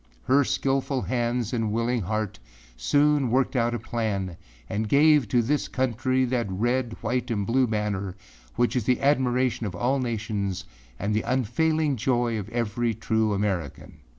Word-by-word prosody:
Her 140 +2 +4
skillful 135 0 0
hands 120 -1 -1
and 115 -3 0
willing 115 +2 0
heart 110 +2 -3 0.4
soon 145 - +2
worked 130 +3 +1
out 120 -1 +1
a - - 0
plan 105 -6 -2 0.3
and 105 +5 -2
gave 150 -2 +5
to 120 +3 +2
this 145 +5 0
country 130 +1 0
that 120 -4 -1
red, 120 +4 -1
white 125 +3 -1
and 105 -4 -1
blue 125 +4 +2
banner 105 -3 -2 0.4
which 120 +1 +1
is 120 -4 0
the 125 0 +2
admiration 130 -4 +1
of 90 - -6
all 130 +8 +1
nations 105 -5 -2 0.3
and 100 +7 -1
the 110 - +1
unfailing 135 +5 +1
joy 120 -1 +1
of 100 - -7
every 115 0 -1
true 110 0 0
American. 95 -8 -3
120 Hz, 155 wpm, -26 LUFS, 105-130 Hz, 0.4 s, gave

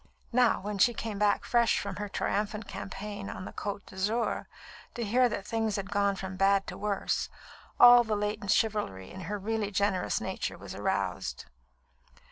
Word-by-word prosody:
Now, 245 -1 +4
when 205 0 -4
she 240 +5 +5
came 215 -3 -4
back 205 -1 +2
fresh 235 -1 +3
from 200 -2 -4
her 205 0 -4
triumphant 210 +1 -2
campaign 200 +1 -6
on 185 - -6
the - - -8
Côte 200 -1 -4
d'Azur, 210 +4 -1 0.5
to 235 - -2
hear 245 +4 +3
that 200 -3 -4
things 225 -1 -1
had 195 0 -4
gone 200 -1 +2
from 190 0 -6
bad 195 +1 +3
to - - -6
worse, 205 -1 -1 0.5
all 245 0 +10
the 220 -2 -1
latent 210 0 -2
chivalry 205 - 0
in 190 - -8
her 210 - -1
really 210 +1 -2
generous 200 -2 +1
nature - - -3
was - - -9
aroused. - - -2
205 Hz, 170 wpm, -30 LUFS, 195-220 Hz, 0.5 s, all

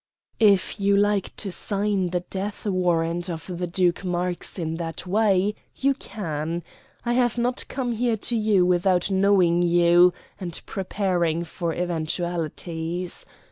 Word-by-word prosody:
"If 205 -1 +3
you 200 0 +3
like 205 -1 +1
to 200 - -5
sign 200 +1 -1
the 180 0 -1
death 200 +4 -5
warrant 175 -2 0
of 165 -2 -5
the 180 - -1
Duke 175 +1 +1
Marx 180 0 -3
in 165 -2 -2
that 165 +1 -5
way, 200 0 +2 0.2
you 275 +1 +2
can. 165 - -4 0.4
I 240 - +1
have 245 -1 +2
not 245 +1 -1
come 255 -2 -2
here 235 0 0
to 235 +3 -1
you 210 -4 +3
without 180 +1 +2
knowing 190 -3 +4
you, 175 +1 +5 0.3
and 175 -3 -4
preparing 180 -4 -1
for 170 -1 -3
eventualities. 170 0 -3
180 Hz, 140 wpm, -24 LUFS, 170-205 Hz, 0.4 s, you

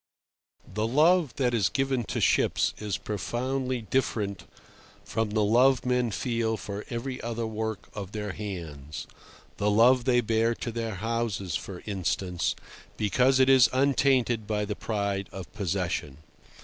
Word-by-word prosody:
The 110 +3 -2
love 155 +4 +3
that 125 -3 +1
is 105 -5 +2
given 135 -3 0
to - - -3
ships - - +2
is 105 -2 -2
profoundly 120 - -2
different 105 -7 -1 0.6
from 110 -1 -1
the 105 0 +1
love 125 +5 +4
men 125 -1 +2
feel 115 0 -1
for 100 0 -6
every 125 +2 -4
other 115 0 -3
work 110 -1 -4
of 100 -2 -6
their 105 -1 -4
hands—the 85 +1 -6
love 120 +4 +5
they 125 -2 +4
bear 115 +1 +1
to 115 - -4
their 115 -2 -3
houses, 110 -4 -2
for 90 -3 -6
instance—because 100 +6 -1
it 130 - +5
is 130 -3 +7
untainted 130 -4 +2
by 105 -1 0
the 105 0 -3
pride 100 -3 -2
of 95 -2 -9
possession. 90 -7 -2
110 Hz, 135 wpm, -27 LUFS, 100-125 Hz, 0.6 s, is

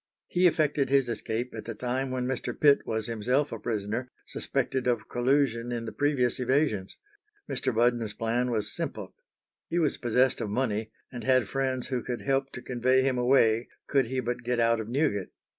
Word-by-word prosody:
He 180 0 +4
effected 150 -4 +1
his 135 -2 +3
escape 120 +1 -3
at 110 - -7
the 115 - -5
time 130 +4 -2
when 130 -1 -2
Mr. 130 -1 -3
Pitt 145 -2 +5
was 110 -1 -1
himself 125 +6 0
a 115 - -5
prisoner, 110 +3 -3 0.2
suspected 130 -1 -2
of 120 -3 0
collusion 120 -2 +1
in 120 -1 -3
the 110 - -5
previous 130 +1 +1
evasions. 125 -7 0 0.5
Mr. 130 - -1
Budden's 115 -2 +1
plan 120 +2 0
was 110 -3 -2
simple. - - -5 0.5
He 170 - -2
was 155 -4 +1
possessed 125 +1 +2
of 105 - -2
money, 110 -1 -1 0.2
and 120 -2 -7
had 130 -4 +3
friends 130 -2 -2
who 125 -2 -1
could 120 -2 -4
help 135 +5 0
to 125 - -7
convey 130 +1 +2
him 130 -2 +1
away 120 -2 +3 0.2
could 135 -4 +2
he 130 +2 -2
but 120 +1 -3
get 125 0 -1
out 115 0 +3
of 110 0 -5
Newgate. 120 - 0
125 Hz, 185 wpm, -28 LUFS, 115-130 Hz, 0.5 s, Pitt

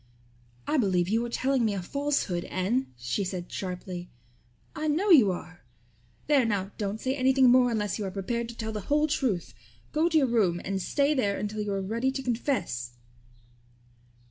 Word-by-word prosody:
"I 310 - +1
believe 185 -7 +2
you 225 +3 +1
are - - -7
telling 260 +1 +1
me 215 -3 +1
a 190 - -3
falsehood, 280 -9 -1
Anne," 215 +9 -1
she 120 +11 -2
said 180 -2 -5
sharply. 180 -1 -5 0.7
"I 310 -1 -2
know 355 +7 +2
you 245 - +7
are. 175 0 -8 0.6
There 285 -3 +4
now, 205 -4 -1
don't 205 +1 -2
say 260 +3 -1
anything 260 -1 +4
more 250 0 +5
unless 210 -3 -1
you 205 - -2
are - - -2
prepared 230 +5 -3
to 235 - -9
tell 220 -1 -3
the 210 -1 -4
whole 300 +1 +4
truth. 260 - -1 0.4
Go 320 +3 +2
to 320 - +3
your 290 - +4
room 210 -8 +2
and 195 0 -2
stay 285 +9 +1
there 205 -8 0
until 210 +1 -3
you 210 -1 -2
are 195 -1 -1
ready 230 +7 0
to 270 0 -4
confess." 225 - -2
220 Hz, 185 wpm, -28 LUFS, 190-265 Hz, 0.7 s, you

